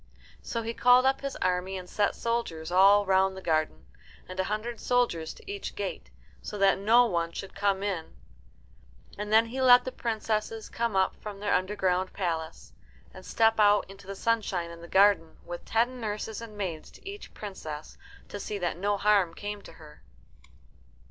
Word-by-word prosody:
So 230 -1 -4
he 230 +1 -3
called 250 +2 +5
up 270 0 +2
his 275 0 -4
army, 185 +1 0
and 180 -1 -8
set 205 +2 0
soldiers 205 -9 -3
all 200 +3 +6
round 190 0 +2
the - - -5
garden, 155 - 0 0.4
and 185 0 -8
a 190 - +1
hundred 215 +3 -3
soldiers 235 -11 0
to - - -16
each 405 0 -6
gate, - - -5 0.3
so 210 - -6
that 195 -1 +4
no 230 +5 +5
one 170 -6 -1
should 195 - -7
come 200 -1 0
in. 185 -6 -3 1.0
And 210 0 -4
then 220 +1 +6
he 255 +3 -4
let 250 -1 +7
the 255 - -3
princesses 220 -2 -2
come 230 -3 -2
up 190 0 +2
from 205 -2 -8
their 205 0 0
underground 185 -1 0
palace, 165 -4 -4 0.4
and 185 - -11
step 225 +3 +2
out 205 0 +5
into 195 0 -14
the 195 - -5
sunshine 195 -6 -1
in 170 0 -11
the 170 - -10
garden, 190 -4 +3
with 175 0 -7
ten 245 +3 0
nurses 215 0 -4
and 220 -2 -10
maids 175 -6 -4
to - - -16
each 405 +1 -9
princess 160 -7 -7 0.3
to 205 - -6
see 205 +1 -4
that 175 -3 -2
no 200 +2 0
harm 200 -5 +3
came 205 0 -5
to - - -13
her. 150 -1 -15
200 Hz, 180 wpm, -28 LUFS, 185-225 Hz, 1.0 s, let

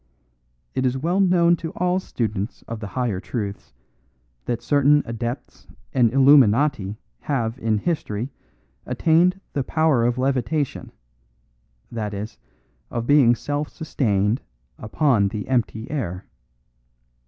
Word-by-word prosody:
It 130 - -1
is 130 0 +1
well 170 +7 0
known 175 -3 +4
to 165 - -5
all 180 +1 +1
students 110 - -4
of 115 -1 -5
the 105 - -6
higher 110 -2 -2
truths 105 -1 -5 0.7
that 120 - -3
certain 145 0 +4
adepts 120 +2 -6 0.3
and 120 -4 +3
illuminati 135 -5 +4 0.2
have 120 -5 -2
in 110 -2 +1
history 125 -4 -2 0.6
attained 175 +4 +3
the 140 - 0
power 155 -4 +2
of 120 +1 +1
levitation 135 +2 -1 1.0
that 105 -3 -4
is, 105 +2 -6 0.5
of 120 -1 -3
being 130 -3 +5
self 145 +3 -3
sustained 110 - 0 0.4
upon 110 -2 +2
the 105 +1 -5
empty 120 -2 -1
air. 100 - -3
125 Hz, 120 wpm, -23 LUFS, 110-145 Hz, 1.0 s, being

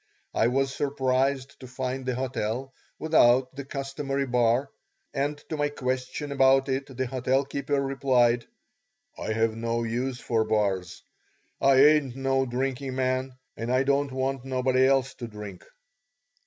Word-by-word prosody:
I 110 - +3
was 135 +2 0
surprised 135 -1 0
to 130 - -10
find 130 +1 -4
the 125 - 0
hotel 130 0 -3 0.2
without 130 -4 +3
the 140 - -5
customary 135 0 -3
bar, 125 +2 +1 0.4
and 145 +2 -1
to 155 - -3
my 145 0 +1
question 130 +1 -3
about 135 0 +4
it 135 +1 -1
the 130 - 0
hotel 130 +2 0
keeper 140 +1 -1
replied, 130 -3 +2 0.7
"I 110 - -3
have 115 0 +1
no 115 +1 -1
use 125 +3 -2
for 115 -3 0
bars; 100 -5 -1 0.6
I 135 0 +5
ain't 150 -4 +4
no 135 0 0
drinking 130 +1 -2
man 130 0 -1 0.2
and 115 +2 -3
I 130 +1 +3
don't 140 0 +1
want 130 0 -2
nobody 130 0 +2
else 135 0 +2
to 120 - -7
drink." 105 -4 -9
130 Hz, 145 wpm, -27 LUFS, 125-135 Hz, 0.7 s, I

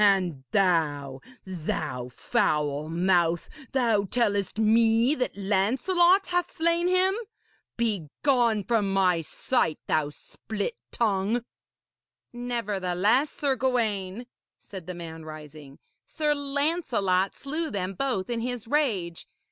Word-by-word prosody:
And 180 -9 +2
thou 145 -8 +1 0.2
thou 155 -8 -4
foul 150 +4 0
mouth! 175 -1 +2 0.2
thou 230 -6 +2
tellest 205 -3 0
me 225 +3 +4
that 250 -7 -2
Lancelot 265 - +3
hath 355 -1 0
slain 335 +2 +2
him! 370 +1 +4 0.6
Begone 230 - +1
from 210 -2 +1
my 185 -3 +3
sight, 165 - 0
thou 155 -2 +1
split 210 +8 -6 0.2
tongue!' 220 +1 0 0.9
'Nevertheless, 225 0 0
Sir 280 -2 -1
Gawaine,' 230 -5 -1 0.3
said 185 -4 -10
the 180 - -5
man, 165 -2 -8
rising, 150 -2 -11 0.3
'Sir 300 -2 0
Lancelot 280 - 0
slew 310 +4 -3
them 195 -5 -3
both 220 -3 -1
in 240 -1 -2
his 245 -1 -4
rage. 215 - -1
205 Hz, 110 wpm, -27 LUFS, 175-250 Hz, 0.9 s, me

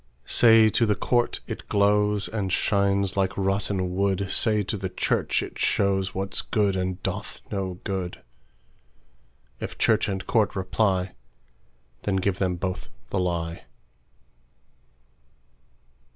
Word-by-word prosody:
Say 115 -2 +6
to 115 +2 +2
the 105 - +2
court, 120 +3 0
it - - -7
glowsAnd 105 0 +1
shines 100 0 +1
like 95 -1 0
rotten 95 -1 -1
wood; 100 0 0
Say 105 -2 +2
to 100 - -3
the 95 -2 -4
church, - - 0
it - - -8
showsWhat's 95 0 0
good, 100 -3 +1
and 95 -1 -2
doth - - -4
no 95 -3 -2
good:If - - -10
church 110 -1 +2
and 95 -1 -3
court 110 -4 +1
reply, 95 -1 0 0.9
Then 100 - -1
give 95 0 0
them 90 -2 0
both 90 +1 -4 0.2
the 100 - 0
lie. 85 -2 -2
95 Hz, 115 wpm, -25 LUFS, 95-105 Hz, 0.9 s, Say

